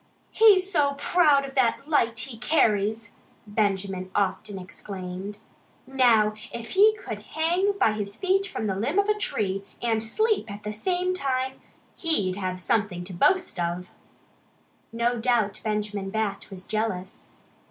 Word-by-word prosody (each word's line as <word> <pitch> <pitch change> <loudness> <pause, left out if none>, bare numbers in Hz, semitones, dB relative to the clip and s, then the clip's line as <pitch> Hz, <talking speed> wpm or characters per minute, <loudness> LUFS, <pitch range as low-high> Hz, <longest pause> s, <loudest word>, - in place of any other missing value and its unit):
"He's 405 -4 +6
so 285 -5 +2
proud 295 -4 +3
of 270 - -9
that 260 +1 +1
light 235 -7 +2
he 230 +2 -5
carries!" 220 -4 +1 0.3
Benjamin 195 -3 -1
often 200 +1 -1
exclaimed, 185 +1 -7 0.5
"Now, 235 -5 +3 0.2
if 230 -1 -7
he 425 +3 +5
could - - -6
hang 350 +6 0
by 225 - +4
his 205 -1 -4
feet 390 - +1
from 220 - -4
the 195 -2 -1
limb 245 - -1
of 400 0 +3
a - - +5
tree 200 - -2 0.2
and 225 -2 0
SLEEP 430 - 0
at 205 +1 -8
the 210 - -4
same 360 - 0
time 265 -5 -2 0.4
he'd 205 - +2
have 185 -2 -3
something 190 -2 0
to 185 +1 -9
boast 370 - +2
of!" 175 +1 -3 1.0
No 235 +1 0
doubt 225 -4 +1
Benjamin 210 -2 -2
Bat 210 -1 -3
was 190 -2 -9
jealous. 210 -4 -3
220 Hz, 145 wpm, -26 LUFS, 200-290 Hz, 1.0 s, He's